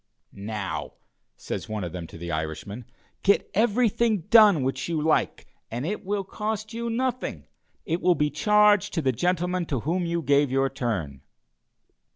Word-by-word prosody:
"Now," 100 -1 -5 0.4
says - - -6
one 110 -2 -3
of 85 - -4
them 85 -1 -6
to 80 - -12
the 85 +1 -6
Irishman, 80 +9 -4 0.4
"get 200 - +2
everything 225 -1 +2
done 210 - +7
which 130 +3 -2
you 165 -2 0
like, 155 +1 0 0.2
and 120 +4 -4
it 210 +6 -3
will 200 +1 -2
cost 215 +2 -4
you 235 +1 -3
nothing; 250 +2 -2 0.4
it 165 +2 -1
will 180 - +4
be 150 -1 0
charged 210 +4 +3
to 165 - 0
the 130 - +3
gentleman 180 +5 -1
to 135 -5 -2
whom 170 +5 -1
you 170 0 -1
gave 145 -1 +3
your 135 +1 +1
turn." 100 - -3
165 Hz, 165 wpm, -25 LUFS, -, 0.4 s, done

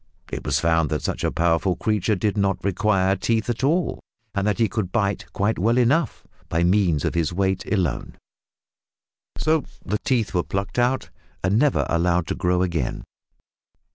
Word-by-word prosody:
It - - -4
was - - +1
found 80 -2 +2
that 75 -2 -2
such - - -3
a - - +1
powerful 85 +2 +1
creature 105 0 0
did 100 +2 -1
not 100 -1 0
require 95 -1 +2
teeth 115 +2 0
at 120 +2 -5
all, 165 +6 +1 0.3
that 100 +1 0
he 115 - +3
could 100 -2 -3
"bite" 100 -3 -1
quite 105 +1 0
well 115 +6 +2
enough 130 +3 +1 0.2
by 85 +1 +1
means 90 -5 +2
of - - 0
his 85 -2 0
weight 95 +1 -1
alone, 90 - -1 1.2
so 155 -1 +2 0.2
the 105 +2 -1
teeth 120 -5 0
were 90 - +2
plucked 95 +6 -3
out 125 +2 +1 0.3
and 95 +4 +2
never 145 0 +2
allowed 85 0 +1
to - - -3
grow 90 0 +1
again. 85 -8 -2
100 Hz, 170 wpm, -23 LUFS, 90-110 Hz, 1.2 s, he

